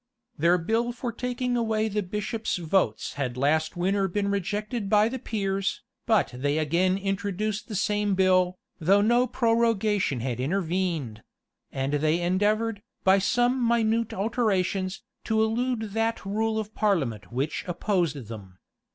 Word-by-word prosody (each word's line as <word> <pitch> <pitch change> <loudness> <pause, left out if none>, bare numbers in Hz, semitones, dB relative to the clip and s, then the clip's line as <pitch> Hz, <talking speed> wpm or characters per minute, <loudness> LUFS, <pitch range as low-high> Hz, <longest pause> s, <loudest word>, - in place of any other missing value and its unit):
359 - - -12
Their 170 0 +3 0.2
bill 240 - -3
for 240 0 -4
taking 250 +1 -2
away 220 -2 +1
the 210 0 -1
bishops' 210 +4 -3
votes 170 - 0
had 125 -2 -2
last 155 +5 +1
winter 195 +2 +1
been 200 +2 -1
rejected 205 +2 -2
by 210 +1 +5
the 260 +3 -4
peers: 195 -4 -2 0.2
but 220 -4 +3
they 145 +4 0
again 170 +5 +2
introduced 200 +2 -2
the 215 - -5
same 205 0 +1
bill, 185 -1 +3 0.2
though 195 +5 +4
no 240 +4 +3
prorogation 220 - +1
had 125 -1 -3
intervened; 165 - -1 0.5
and 135 +1 -2
they 155 +3 +2
endeavored, 205 +5 +1 0.2
by 190 +1 +5
some 245 +5 +2
minute 230 -1 +2
alterations, 195 -3 -1 0.2
to 220 -1 0
elude 225 -1 -1
that 225 0 -1
rule 220 +2 0
of 215 0 -4
parliament 140 - 0
which 135 +5 -2
opposed 170 - -1
them. 100 -5 -10
200 Hz, 140 wpm, -26 LUFS, 175-220 Hz, 0.5 s, by